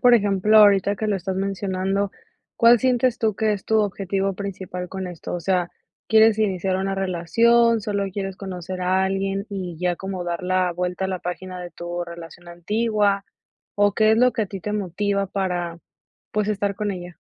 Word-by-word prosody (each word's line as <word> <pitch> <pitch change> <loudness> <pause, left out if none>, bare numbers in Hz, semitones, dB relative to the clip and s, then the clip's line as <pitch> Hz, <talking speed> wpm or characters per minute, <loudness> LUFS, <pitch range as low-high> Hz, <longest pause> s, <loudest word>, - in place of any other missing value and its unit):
por 245 -1 +6
ejemplo, 205 0 +3
ahorita 200 -1 +6
que 215 - -2
lo 205 - +1
estás 190 +1 -4
mencionando, 195 0 -1 0.5
¿cuál 235 0 +6
sientes 250 -1 +2
tú, 220 -3 +1
que 215 0 +1
es 200 - -5
tu 220 0 +3
objetivo 195 -1 -1
principal 185 -2 -6
con 190 0 -5
esto? 175 0 -6
O 175 - -3
sea, 180 0 0 0.4
¿quieres 220 -1 +5
iniciar 190 -3 0
una 195 +1 -1
relación, 225 +6 +3
solo 200 -1 -1
quieres 195 0 -4
conocer 185 -1 -6
a 185 +1 +2
alguien? 195 +1 -1
Y 185 -4 -5
ya, 180 -1 0
como 190 -2 -5
dar 175 +1 -3
la 185 -1 +1
vuelta 180 +2 -2
a 190 - -1
la 185 -1 -2
página 180 +1 -6
de 175 -1 -7
tu 175 0 -5
relación 170 0 -11
antigua, 205 +2 0 0.5
¿o 205 -1 +3
qué 215 +1 +4
es - - +3
lo 250 +2 +4
que 220 - -1
a - - -2
ti 195 0 -7
te 210 - -4
motiva, 200 0 -1
para, 180 -3 -2 0.5
pues, 210 0 0
estar 200 -1 -1
con 205 0 -2
ella? 175 -1 -8
195 Hz, 190 wpm, -23 LUFS, 180-210 Hz, 0.5 s, por